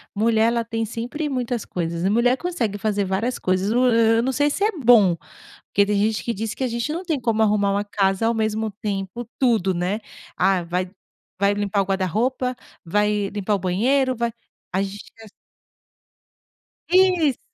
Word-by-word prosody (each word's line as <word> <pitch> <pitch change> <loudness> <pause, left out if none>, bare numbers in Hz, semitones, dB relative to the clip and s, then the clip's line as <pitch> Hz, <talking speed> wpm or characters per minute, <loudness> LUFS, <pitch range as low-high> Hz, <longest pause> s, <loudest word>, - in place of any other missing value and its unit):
Mulher, 220 +1 +3
ela 235 0 +1
tem 225 0 -3
sempre 240 +8 -4
muitas 245 -4 -2
coisas, 170 0 -3
a - - +3
mulher 240 +4 +3
consegue 295 - -2
fazer 205 0 0
várias 200 +7 -1
coisas. 185 +2 0
Ah, - - 0 0.4
eu 230 - +2
não 265 - 0
sei 290 +3 +2
se 400 - -1
é 430 - +3
bom, 235 - +5 0.5
porque 200 0 +2
tem 205 0 0
gente 215 0 0
que 235 - -1
diz 220 +1 -3
que 265 - -3
a - - +2
gente 235 +5 -2
não 345 +4 -4
tem 320 -6 -1
como 225 -2 +1
arrumar 205 -2 +2
uma 200 +1 0
casa, 195 +1 0
ao 230 - +2
mesmo 220 0 -1
tempo, 200 +2 -3
tudo, 225 -8 +2
né. 180 +4 -2 0.4
Ah, 190 -2 +2
vai 180 +2 -2 0.5
vai 200 0 +3
limpar 205 0 0
o - - +1
guarda-roupa, 215 +7 -1 0.3
vai 210 +3 +1
limpar 205 0 -1
o - - 0
banheiro, 255 +9 +1
vai 235 0 -1 0.4
a 185 - +1
gente 200 +1 -5
fica 225 0 -16 1.6
Isso. 360 -7 +3
220 Hz, 180 wpm, -22 LUFS, 195-245 Hz, 1.6 s, bom